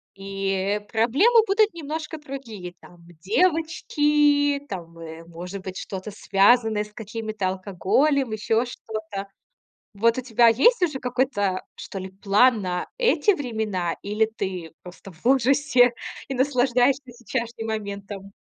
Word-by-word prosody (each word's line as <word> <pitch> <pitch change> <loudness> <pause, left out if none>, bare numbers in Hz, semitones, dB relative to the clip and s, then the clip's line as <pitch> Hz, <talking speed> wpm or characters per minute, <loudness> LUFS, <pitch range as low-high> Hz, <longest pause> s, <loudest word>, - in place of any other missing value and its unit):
и, 195 0 -3
э, 195 +2 0
проблемы 270 - +3
будут 430 +2 +3
немножко 315 0 -5
другие. 240 - -8
Там 175 - -16 0.2
девочки, 295 - +2
там, 170 -4 -7
э, 165 0 -9
может 175 +3 -8
быть 185 -1 -6
что-то 195 +2 -6
связанное 210 +2 +3
с 210 0 -15
какими-то 215 -2 -4
алкоголем, 215 - +1
ещё 220 +2 +1
что-то. 215 -4 -6 0.7
Вот 230 +4 +2
у - - -3
тебя 240 -1 +3
есть 315 - +4
уже 300 -6 0
какой-то, 245 -7 0
что - - -8
ли, 190 0 -6
план 210 +4 +3
на 180 -1 -3
эти 470 -3 +3
времена 220 - -2
или 210 +2 +1
ты 185 -5 -4
просто 185 +2 -12
в 170 +5 -22
ужасе 260 -1 +4 0.3
и 270 - -4
наслаждаешься 255 0 +2
сечяшным 235 -1 -5
моментом? 200 -2 -5
225 Hz, 130 wpm, -24 LUFS, 195-270 Hz, 0.7 s, есть